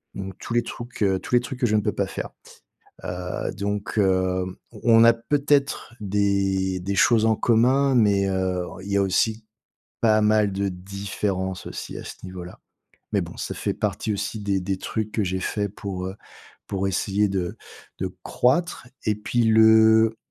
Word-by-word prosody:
Donc 95 -1 -6
tous - - -6
les 120 0 +2
trucs, 120 -1 -6
heu, 95 -2 +2
tous 125 - -1
les 120 - +5
trucs 125 +1 -7
que 130 - +2
je 110 - +1
ne 105 - +2
peux - - 0
pas - - -1
faire. - - -5 0.8
Heu, 90 0 -4
donc 100 +1 -3
hem, 95 -2 +1 0.2
on 115 -1 +4
on - - +8
a 115 - +7
peut-être 140 +2 0
des 95 -2 +1
des 100 +2 -2
choses 115 +1 +4
en 110 0 +3
commun, 130 +5 +3
mais 100 -4 +3
heu, 95 -1 -1 0.2
il 100 - -6
y 100 - +2
a - - +4
aussi 110 +4 0 0.6
pas 110 -1 +4
mal 105 -1 +3
de 100 +1 -1
différences 95 0 -4
aussi, - - -7
à - - -7
ce - - -7
niveau-là. 90 -1 -9 0.5
Mais - - +2
bon, - - -8
ça - - -4
fait - - -2
partie 110 - -2
aussi 105 +2 -3
des 100 -2 0
des 95 +1 -2
trucs 110 +2 -3
que 110 - 0
j'ai 95 0 -2
faits 100 +1 -2
pour, 95 -3 -5
heu, 95 - -6 0.5
pour 95 0 -1
essayer 100 +2 +1
de 95 -3 -2 0.4
de - - -3
croître. 135 +1 +1 0.2
Et 105 - +3
puis 120 +3 0
le 110 0 +6
100 Hz, 185 wpm, -24 LUFS, 95-110 Hz, 0.8 s, on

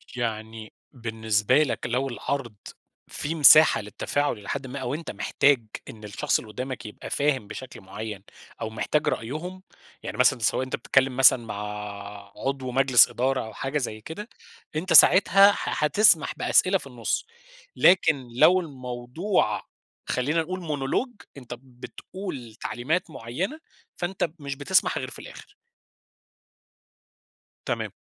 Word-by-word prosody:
يعني 110 -2 -5 0.2
بالنسبة 110 +2 +1
لك 135 - -3
لو 125 +3 -1
العرض 120 -2 -4 0.5
في 155 +3 -4
مساحة 155 -2 +7
للتّفاعُل 120 +6 -2
إلي 100 - -11
حَدًّ 140 -1 -3
ما، 135 +2 -6
أو 130 0 -3
أنت 160 +3 -5
محتاج 140 -5 +1 0.2
إن 110 -1 -11
الشخص 105 -1 -1
اللي 110 - -11
قُدّامك 130 +2 -6
يبقى 105 - -9
فاهم 140 -6 0
بشكل 130 +5 -9
مُعيَّن 100 +1 -7 0.4
أو - - -3
محتاج 150 +7 -1
رأيهم، 170 +10 -4 0.4
يعني - - -6
مثلًا 125 0 +4
سواء 115 +3 +1
أنت 130 - -3
بتتكلِّم 130 +1 +1
مثلًا 125 -2 +5
مع 110 - -6 0.8
عضو 135 -2 -3
مجلس 130 -1 +5
إدارة 130 +1 -1
أو 110 - -10
حاجة 135 +6 -3
زي 110 -6 -4
كده، 205 - -8 0.5
أنت 165 +3 -1
ساعتها 195 +4 +7
ح - - -4
حتسمح 160 +1 +3
بأسئلة 190 +1 +3
في 160 - -12
النُصّ، 120 -4 -3 0.5
لكن 155 -7 +4
لو 180 +9 +6
الموضوع 130 - -2 0.5
خلّينا 150 +6 0
نقول 185 +3 -5
Monologue 160 - -3
أنت 125 -3 -8
بتقول 130 - -9
تعليمات 155 +10 -2
مُعيّنة، 155 - -4 0.4
فأنت 175 -1 -2
مش 140 -1 -5
بتسمح 165 +7 +1
غير - - -4
في - - -12
الآخر. 455 -4 -13 2.1
تمام. - - -2
135 Hz, 135 wpm, -25 LUFS, 120-160 Hz, 2.1 s, مساحة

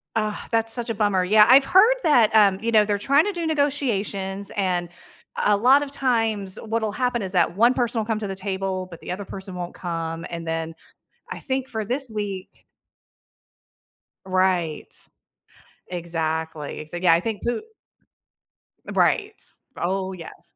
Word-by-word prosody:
Ugh, 215 -1 0 0.2
that's 225 0 +2
such 240 -1 -2
a - - 0
bummer. 205 -3 +1
Yeah, 210 +3 +6
I've 270 +2 +7
heard 440 +7 +6
that, 235 -8 +4
um, 200 -3 +5
you 230 +1 -1
know, 215 -2 +5
they're 205 -1 0
trying 280 - +3
to 415 - 0
do 340 -3 -3
negotiations, 210 -10 -1
and 180 -3 0 0.5
a 210 -1 +4
lot 260 +6 +5
of 285 -1 -5
times 225 -8 0
what'll 220 -1 -1
happen 245 -1 -1
is 185 - -4
that 175 -1 +2
one 240 +3 +5
person 240 -2 0
will 215 - -1
come 220 -1 -1
to 210 - -4
the 195 - -4
table, 190 -1 -3
but 170 - -10
the - - -7
other 195 +2 -5
person 190 -1 -7
won't 175 -1 -5
come. 165 -1 -4
And 170 -1 -6
then 165 0 -3 0.6
I - - -5
think 265 -1 -3
for 220 -2 -3
this 255 +2 -2
week 200 -3 -5 1.6
Right. 185 -4 0 1.0
Exactly. 160 -3 -3
So, 175 - -7
yeah, 175 -1 +4
I 170 - +2
think 215 0 -4
Pu 240 - -1 1.3
Right. 420 +1 +1 0.4
Oh, 190 +1 -2
yes. 170 -3 -10
205 Hz, 165 wpm, -23 LUFS, 180-235 Hz, 1.6 s, I've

